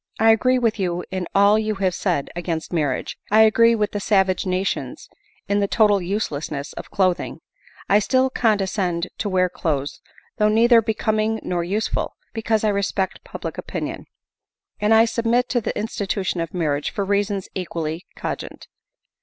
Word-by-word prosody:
I 225 Hz, 0 st, +6 dB
agree 255 Hz, +3 st, +3 dB
with 230 Hz, -3 st, 0 dB
you 175 Hz, -2 st, -1 dB
in 185 Hz, -2 st, -3 dB
all 200 Hz, +2 st, +5 dB
you 215 Hz, -1 st, -1 dB
have 190 Hz, -2 st, 0 dB
said 175 Hz, -7 st, -1 dB
against 170 Hz, -1 st, -4 dB
marriage; 145 Hz, -6 st, -1 dB
I 215 Hz, +1 st, +6 dB
agree 230 Hz, +1 st, +5 dB
with 210 Hz, -2 st, 0 dB
die 205 Hz, -, -3 dB
savage 190 Hz, -2 st, +1 dB
nations 185 Hz, +1 st, -2 dB, 0.4 s
in 205 Hz, 0 st, +1 dB
the 200 Hz, -, +1 dB
total 205 Hz, -2 st, +3 dB
uselessness 155 Hz, -7 st, -3 dB
of -, -, -8 dB
clothing; 185 Hz, -3 st, 0 dB, 0.6 s
still 260 Hz, +4 st, +2 dB
I -, -, -4 dB
condescend 190 Hz, -5 st, +1 dB
to 210 Hz, -, -1 dB
wear 185 Hz, -1 st, +2 dB
clothes 145 Hz, -5 st, -3 dB, 0.4 s
though 210 Hz, 0 st, +3 dB
neither 230 Hz, +2 st, +5 dB
becoming 220 Hz, 0 st, 0 dB
nor 175 Hz, -1 st, -1 dB
useful, 200 Hz, +5 st, -2 dB, 0.2 s
because 220 Hz, -1 st, 0 dB
I 215 Hz, -, +3 dB
respect 200 Hz, -1 st, -1 dB
public -, -, -6 dB
opinion; -, -, -5 dB, 0.7 s
and 210 Hz, +1 st, +1 dB
I 225 Hz, 0 st, +7 dB
submit 235 Hz, +2 st, +1 dB
to 245 Hz, -, +1 dB
the -, -, -3 dB
institution 200 Hz, -4 st, -2 dB
of 165 Hz, -2 st, -4 dB
marriage 150 Hz, -5 st, -1 dB
for 200 Hz, -, -3 dB
reasons 200 Hz, -1 st, 0 dB
equally 165 Hz, -2 st, -4 dB
cogent. -, -, -6 dB
200 Hz, 160 wpm, -22 LUFS, 180-220 Hz, 0.7 s, I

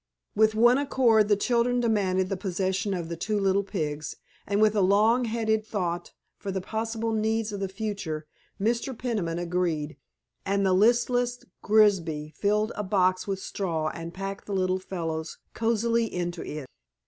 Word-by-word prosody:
With 220 Hz, 0 st, +4 dB
one 240 Hz, +4 st, +5 dB
accord 240 Hz, -6 st, +3 dB
the 205 Hz, -, +4 dB
children 240 Hz, +3 st, +1 dB
demanded 195 Hz, -5 st, +1 dB
the 195 Hz, -, -1 dB
possession 190 Hz, +1 st, -1 dB
of 170 Hz, -2 st, -4 dB
the 170 Hz, -, -4 dB
two 210 Hz, +5 st, -1 dB
little 195 Hz, 0 st, +2 dB
pigs, 155 Hz, -7 st, -4 dB, 0.3 s
and 200 Hz, +1 st, +1 dB
with 215 Hz, 0 st, +4 dB
a 205 Hz, -, +3 dB
long 215 Hz, +6 st, +4 dB
headed 220 Hz, -1 st, 0 dB
thought 175 Hz, -5 st, -3 dB, 0.3 s
for 200 Hz, -, -6 dB
the 190 Hz, -, -2 dB
possible 225 Hz, +3 st, -3 dB
needs 220 Hz, 0 st, 0 dB
of 205 Hz, -, -4 dB
the 195 Hz, -, -1 dB
future 190 Hz, -7 st, -4 dB, 0.3 s
Mr. 235 Hz, +4 st, -1 dB
Peniman 205 Hz, -10 st, -2 dB
agreed, 170 Hz, -4 st, -1 dB, 0.5 s
and 200 Hz, 0 st, +1 dB
the 190 Hz, -, +3 dB
listless 245 Hz, +4 st, +2 dB, 0.2 s
Grigsby 175 Hz, -8 st, +2 dB
filled 210 Hz, +2 st, +1 dB
a -, -, -2 dB
box 185 Hz, -1 st, +1 dB
with 195 Hz, -1 st, -1 dB
straw 170 Hz, -5 st, -2 dB
and 165 Hz, +1 st, -7 dB
packed 195 Hz, +2 st, -6 dB
the 200 Hz, -, -2 dB
little 185 Hz, 0 st, +1 dB
fellows 165 Hz, -4 st, -4 dB, 0.2 s
cosily 230 Hz, 0 st, +1 dB
into 175 Hz, -1 st, -3 dB
it. 150 Hz, -2 st, -6 dB
200 Hz, 160 wpm, -27 LUFS, 180-220 Hz, 0.5 s, one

